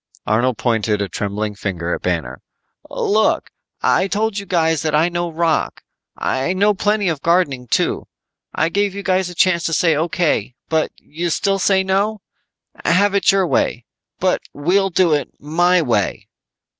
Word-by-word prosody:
Arnold 120 +3 +1
pointed 110 -3 0
a 100 - -1
trembling 105 +2 -3
finger 90 -4 -3
at - - -4
Banner. 80 -8 -3 0.5
"Look, 215 +1 +1 0.3
I 190 - +3
told 210 +1 -1
you 200 - -9
that 160 -3 +1
I 160 +3 +3
know 175 -1 -2
rock. 165 0 -1 0.3
I 150 +8 -1
know 205 +3 +3
plenty 205 0 0
of 160 -5 -1
gardening, 165 -8 +1
too. - - 0 0.4
I - - 0
gave 200 +2 0
you 200 - -5
guys 185 -1 +1
a 180 - -10
chance 170 -1 +2
to 165 - -1
say 165 -1 +3
O.K. 155 - 0 0.4
You 170 +3 -5
still 195 +4 0
say 190 0 +3
no? 200 +2 0 0.6
Have 200 +4 +3
it 200 0 +4
your 195 -1 +2
way, 120 -7 0 0.3
but - - +1
we'll 190 +7 +1
do 175 -2 +2
it 145 - 0
my 175 +4 +2
way." 115 -8 -1
170 Hz, 155 wpm, -19 LUFS, 130-190 Hz, 0.6 s, it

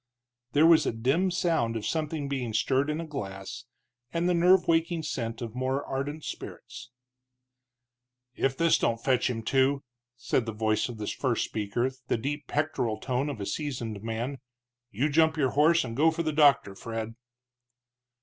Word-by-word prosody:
There 150 +2 +5
was 165 -1 +6
a - - +2
dim 135 +12 +1
sound 160 -10 0
of 110 - -3
something 155 -2 -2
being 130 -5 -3
stirred 135 +5 +2
in 150 +1 -1
a 165 - -4
glass, 100 -7 -6 0.5
and 170 +1 0
the 180 - +3
nerve 180 +2 +4
waking 165 0 +1
scent 115 -5 -3
of 115 -2 -6
more 130 +2 -1
ardent 145 +3 -4
spirits. - - -8 1.5
"If 135 0 0
this 165 0 +4
don't 115 - +1
fetch 130 -1 +2
him 115 -2 -3
to," 135 +3 +2 0.3
said 125 -2 0
the 110 - -3
voice 110 +1 0
of 120 - -7
the 105 - -4
first 120 +1 -1
speaker, 110 +5 -1 0.2
the - - +1
deep 145 +5 -4
pectoral 145 -7 -1
tone 130 +4 -1
of 135 -6 -5
a 100 - -3
seasoned 120 -7 -4
man, 115 +5 -3 0.5
"you 125 +6 0
jump 160 +1 +3
your 135 -4 +2
horse 160 +4 +4
and 115 -2 -6
go 155 +5 +5
for 165 +1 -2
the 155 -1 -1
doctor, 140 -9 +4
Fred." 115 +2 -5
135 Hz, 170 wpm, -28 LUFS, 115-155 Hz, 1.5 s, was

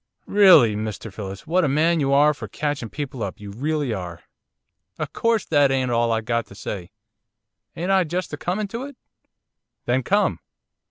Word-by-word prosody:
'Rilly, 185 - +6
Mr 110 0 -5
Phillips, 95 0 -7
what 180 +3 +2
a - - +2
man 160 +4 +2
you 135 -2 +1
are 145 +2 +5
for - - -8
catching 145 -6 -3
people 140 -2 -6
up, 95 -4 -4
you 100 -1 -8
rilly 145 +2 -1
are. 90 -4 -6 0.7
O' - - -2
course 230 -2 0
that 145 -3 +3
ain't 130 -2 0
all 115 0 +2
I've 115 -1 -1
got 115 -2 -1
to 100 - -14
say, 95 -3 -6 0.9
ain't 180 +3 -2
I 190 -1 +4
just 175 +1 -4
a - - -3
comin' 195 +7 -2
to 230 +4 -5
it?' 285 -2 -11 0.9
'Then 125 +2 +1
come. 190 - +1
140 Hz, 180 wpm, -23 LUFS, 110-170 Hz, 0.9 s, Rilly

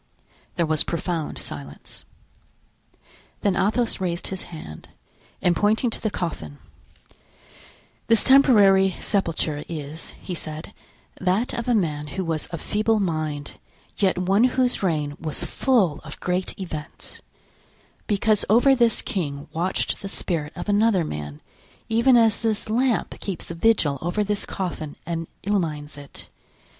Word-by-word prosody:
There 170 - +2
was 155 -1 +1
profound 170 -1 -3
silence. 70 -1 -8 1.4
Then 200 -3 +2
Athos 220 +2 +1
raised 175 -1 -1
his 190 -1 -4
hand 115 - -9 0.5
and 175 -2 +4
pointing 220 +6 +2
to - - -3
the 215 - 0
coffin: 115 - -4 1.5
"This 230 -2 +6
temporary 205 -9 +6
sepulture 165 -6 -1
is," 155 -1 -6
he 185 - -6
said, 155 -2 -6 0.5
"that 190 +6 +1
of 235 -2 -3
a 245 - +3
man 150 -7 0
who 190 - -1
was 160 -2 -1
of 170 -3 -6
feeble 215 +1 +1
mind, 155 -6 -3 0.4
yet 190 -3 +2
one 195 +6 +3
whose 255 -1 +1
reign 150 -6 0
was 155 -2 -2
full 200 - +2
of - - -10
great 180 +2 -2
events; 155 -5 -7 0.9
because 210 0 +2
over 245 +6 +6
this 235 -3 +3
king 145 -7 -3
watched 175 +4 -1
the 195 - -5
spirit 160 -6 -2
of - - -6
another 205 -2 +3
man, 75 - -6 0.5
even 235 +3 +5
as 225 -2 +4
this 220 -2 -1
lamp 245 +1 +1
keeps 190 -5 -5
vigil 165 -6 +2
over 175 +5 0
this 205 0 -1
coffin 165 -6 -4
and 165 -1 -3 0.2
illumines 160 -8 -1
it. 145 -1 -11
185 Hz, 135 wpm, -24 LUFS, 155-215 Hz, 1.5 s, This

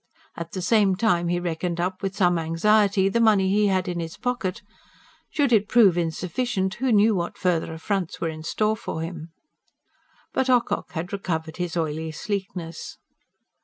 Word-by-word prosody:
At 170 0 -7
the 185 - -4
same 205 -2 +3
time 180 -5 +1
he 175 +1 0
reckoned 170 0 -3
up, 185 +2 -2
with 195 -1 -3
some 180 -4 +3
anxiety, 195 +4 +3
the 195 +4 +1
money 210 -4 +4
he 205 +1 +3
had 190 -1 +1
in 175 -1 -2
his 165 -1 -5
pocket. 235 -5 -2 0.7
Should 280 -5 +1
it 210 -2 +4
prove 215 -7 +6
insufficient, 190 +4 -1
who 255 +3 -1
knew 215 +1 +5
what 175 -3 -3
further 175 -3 0
affronts 175 +2 -3
were 165 - -1
in 155 0 -7
store 215 +7 0
for 160 -6 -5
him. 165 -1 -7 1.0
But 260 0 0
Ocock 250 -2 +1
had 175 +3 -4
recovered 160 -5 -3
his 175 -1 -3
oily 160 0 -2
sleekness. 180 -2 -5
185 Hz, 165 wpm, -24 LUFS, 170-210 Hz, 1.0 s, prove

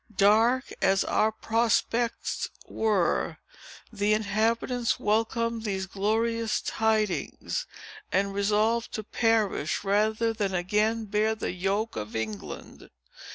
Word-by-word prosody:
Dark 225 +6 +3
as 195 0 +3
our 215 +1 +2
prospects 230 +1 0 0.2
were, 210 -6 0 0.6
the 210 0 +2
inhabitants 225 +3 0
welcomed 225 +2 0
these 195 -3 -2
glorious 220 +3 0
tidings, 220 - -1 0.4
and 200 0 +1
resolved 215 +3 +1
to 215 - -3
perish, 215 -7 0
rather 215 +3 +1
than 200 -4 -1
again 210 +5 +1
bear 215 +2 +1
the 215 - -3
yoke 195 +5 -1
of 105 0 -5
England!" 110 -3 -6
215 Hz, 105 wpm, -27 LUFS, 200-225 Hz, 0.6 s, Dark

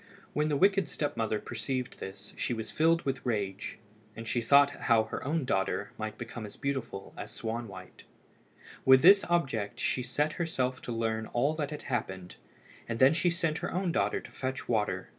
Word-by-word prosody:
When 150 +1 +1
the 145 - +1
wicked 195 -2 +3
step 145 - -2
mother 110 -1 0
perceived 125 +2 -4
this, 100 +2 -8
she 120 - -1
was 110 -1 -5
filled 165 +1 +3
with 135 -2 -2
rage, 100 -5 -2 0.4
and 115 +1 -7
she 120 - 0
thought 140 +4 +6
how 115 -3 +3
her 110 - -5
own 150 +1 0
daughter 100 -2 0
might 110 0 -5
become 120 -1 -6
as 105 - -9
beautiful 135 -8 -4
as - - -7
Swanwhite. 110 -5 -6 0.8
With 130 +1 +7
this 195 +3 +8
object 135 -12 0
she 130 - 0
set 145 +5 0
herself 130 -6 -1
to - - -6
learn 110 -1 -1
all 140 +6 +2
that 150 -3 -2
had 150 - -6
happened, 95 -8 -4 0.5
and 115 - -1
then 130 +5 +6
she 170 +2 +2
sent 165 -2 0
her - - -3
own 180 0 0
daughter - - +1
to - - -12
fetch 130 0 -4
water. 110 -3 0
125 Hz, 185 wpm, -30 LUFS, 110-150 Hz, 0.8 s, this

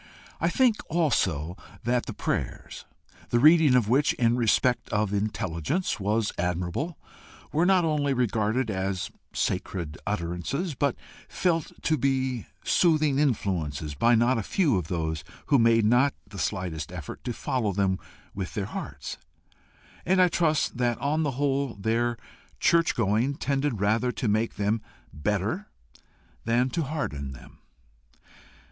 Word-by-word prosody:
I - - +2
think 250 -5 +3
also 95 - +1 0.3
that 120 +1 0
the - - -4
prayers, - - -4 0.4
the 120 - +2
reading 155 0 +6
of 120 -5 +3
which, 135 +6 +3
in 120 -1 +2
respect 125 +1 +2
of 105 -1 0
intelligence, 105 - -1
was 105 +2 0
admirable, 90 - -2 0.5
were 165 +4 +2
not 185 -3 +4
only 150 -3 +1
regarded 115 -1 +1
as 95 -1 -2 0.2
sacred 85 -4 -2
utterances, 100 - -2
but 140 -1 0 0.3
felt 165 -4 0
to 155 -2 +1
be 130 -3 0 0.2
soothing 155 -5 +3
influences 85 - -1
by 115 - +4
not 120 +2 +3
a - - 0
few 145 - +1
of 90 -4 -1
those 80 -3 -2 0.3
who 140 -3 +5
made 115 -1 +4
not 125 +5 +4
the 100 - -10
slightest 85 -6 -3
effort 90 -6 -8
to 125 - -1
follow 120 -2 -1
them 95 -1 +1 0.3
with 95 -2 -5
their 100 - -1
hearts; - - -6 0.8
and 185 +2 +2
I 180 -1 +6
trust 155 -6 +1
that 120 -2 +1
on 150 +3 0
the 140 -5 -1
whole 140 -2 0
their 115 +3 0 0.4
church 165 0 +3
going 115 +5 +1
tended 140 -5 -1
rather 110 +5 +2
to 120 - -2
make 110 +2 +1
them 105 +2 0 0.3
better 105 - -1 0.8
than 120 +3 +1
to 170 - -1
harden 70 - -4
them. 65 - -14
115 Hz, 140 wpm, -27 LUFS, 100-140 Hz, 0.8 s, reading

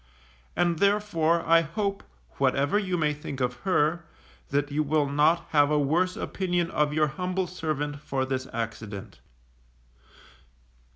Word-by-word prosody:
And 170 -2 +1
therefore 190 -5 +2
I 165 0 +6
hope, 195 +5 -3 0.4
whatever 145 +9 +2
you 185 -4 -1
may 150 -2 +1
think 145 -2 -7
of 125 -1 -1
her, 165 0 +2 0.5
that 145 +1 0
you 150 +2 +1
will 150 0 +1
not 155 +4 +2
have 145 -2 +4
a 150 - +2
worse 170 +6 +1
opinion 175 -3 -1
of 150 -1 +1
your 155 0 +3
humble 180 +5 -2
servant 150 -4 -3
for 135 -2 -2
this 130 -1 -3
accident. 110 -3 -6
155 Hz, 135 wpm, -27 LUFS, 145-175 Hz, 0.5 s, I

